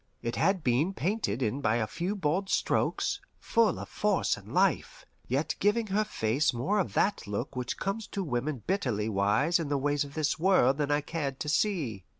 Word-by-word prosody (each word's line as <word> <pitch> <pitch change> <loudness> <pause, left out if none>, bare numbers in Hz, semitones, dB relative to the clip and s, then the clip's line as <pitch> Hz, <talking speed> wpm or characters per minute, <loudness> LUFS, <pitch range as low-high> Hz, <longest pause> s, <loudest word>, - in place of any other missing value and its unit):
It 115 - -2
had 190 -4 +1
been 145 +10 +1
painted 170 - -1
in 125 +5 -1
by 110 -4 +2
a 115 -2 +1
few 175 - -3
bold 190 +2 -1
strokes, - - 0 0.2
full 230 -4 +2
of - - -6
force 205 -3 +1
and - - -12
life, - - +1 0.2
yet 140 +5 0
giving 210 +3 +2
her 215 +2 +3
face 135 - 0
more 170 - 0
of 190 - -1
that 200 - +1
look 105 +7 -4
which 125 -1 -3
comes 200 +3 -3
to 200 - -3
women 135 - -2
bitterly 120 - 0
wise 110 - +2
in 160 -4 -3
the 145 - +1
ways 145 +1 +1
of 140 0 -10
this 155 0 0
world 155 -7 +4
than 145 -1 0
I 145 0 +2
cared 145 -3 -4
to 150 - -2
see. 150 - 0
150 Hz, 195 wpm, -29 LUFS, 125-190 Hz, 0.2 s, world